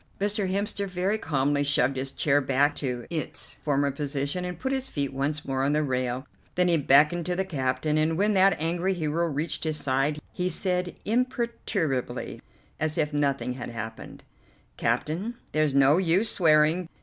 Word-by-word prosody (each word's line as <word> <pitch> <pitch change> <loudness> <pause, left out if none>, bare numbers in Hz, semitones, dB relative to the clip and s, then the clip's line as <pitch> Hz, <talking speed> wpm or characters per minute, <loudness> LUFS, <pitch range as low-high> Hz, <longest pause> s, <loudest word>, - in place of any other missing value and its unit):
Mr. 205 -1 0
Hemster 200 +1 -1
very 190 +4 -1
calmly 145 -3 +1
shoved 140 -1 +2
his 130 +1 -2
chair 145 0 +2
back 140 +2 +2
to 125 -4 -3
its 160 -3 -4
former 140 -1 +1
position, 140 +4 -3
and 180 -2 -4
put 265 - -2
his 265 -1 -1
feet 140 -2 -2
once 145 +2 -2
more 135 -1 -1
on 140 +2 +2
the 155 0 +2
rail, 130 -1 -2 0.3
then 180 0 +3
he 175 - +3
beckoned 150 +3 +4
to 180 - 0
the 190 +1 -1
captain, 145 -1 0
and 160 +1 +1
when 210 +3 +2
that 195 -2 +4
angry 175 +4 0
hero 165 0 0
reached 150 +1 -2
his 155 -1 -1
side 135 +2 0
he 180 0 -1
said 180 0 0
imperturbably, 235 - -1 0.4
as 155 0 -1
if 150 -1 0
nothing 140 -3 0
had 125 -2 -6
happened: 115 -1 -8 0.5
"Captain, 190 +10 -1 0.2
there's 155 -2 +1
no 140 +3 +5
use 190 +5 +3
swearing. 160 +1 +3
155 Hz, 170 wpm, -26 LUFS, 140-180 Hz, 0.5 s, no